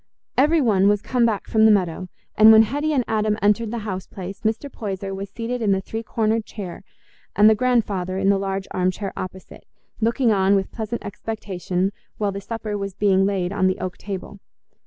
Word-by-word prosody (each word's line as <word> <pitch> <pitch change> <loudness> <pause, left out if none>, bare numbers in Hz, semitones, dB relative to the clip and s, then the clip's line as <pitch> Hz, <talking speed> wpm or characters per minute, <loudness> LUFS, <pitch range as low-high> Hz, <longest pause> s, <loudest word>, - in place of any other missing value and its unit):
Everybody 260 - +3
was 205 0 +2
come 245 -2 +2
back 215 -3 -2
from 220 -1 +4
the 220 - +7
meadow; 185 -2 0 0.3
and 215 +1 +8
when 220 0 +8
Hetty 290 +7 -1
and 270 -4 +2
Adam 215 -1 0
entered 210 +2 +2
the 235 - -3
house 190 -3 -4
place, 190 0 -8
Mr. 220 +5 -1
Poyser 195 -6 -5
was 195 +1 -6
seated 235 +4 -4
in 205 -3 +3
the 190 - +1
three 220 +3 -5
cornered 220 0 0
chair, 195 -5 -8 0.5
and 210 - +6
the 220 - +7
grandfather 210 -6 0
in 195 0 +2
the 200 -1 +3
large 195 0 -3
arm 185 0 +1
chair 195 +2 -5
opposite, 185 0 -8 0.3
looking 230 +2 +2
on 195 -1 +3
with 195 -1 -1
pleasant 225 +1 -5
expectation 195 -3 -3 0.3
while 205 -2 0
the 200 0 -6
supper 220 0 -5
was 195 -1 -5
being 195 -1 +3
laid 190 -2 -1
on 190 -2 +2
the 185 - 0
oak 185 -1 -4
table. 200 0 -7
205 Hz, 200 wpm, -22 LUFS, 190-225 Hz, 0.5 s, and